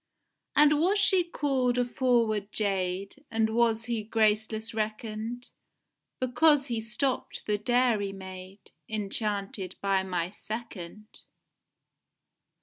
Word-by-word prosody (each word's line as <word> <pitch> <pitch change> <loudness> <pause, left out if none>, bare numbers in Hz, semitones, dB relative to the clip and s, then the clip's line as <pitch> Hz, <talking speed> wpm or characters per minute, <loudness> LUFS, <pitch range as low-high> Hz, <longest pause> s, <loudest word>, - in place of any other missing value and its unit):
And 300 0 +6
was 380 +5 +3
she 385 -2 +4
call'd 265 -7 0
a 245 - +2
forward 230 -5 +1
jade, 195 +4 -2
And 225 -1 +1
was 230 -1 +2
he 235 -2 -1
graceless 220 +1 +1
reckon'd, 220 +2 -4 0.7
Because 275 +3 +4
he 230 -2 -1
stopt 245 +4 -2
the 210 -1 0
dairy 240 -4 +2
maid, 190 0 -10 0.2
Enchanted 200 -2 -2
by 195 -1 +2
my 180 -2 -2
second? 215 -3 -7
220 Hz, 105 wpm, -28 LUFS, 200-245 Hz, 0.7 s, And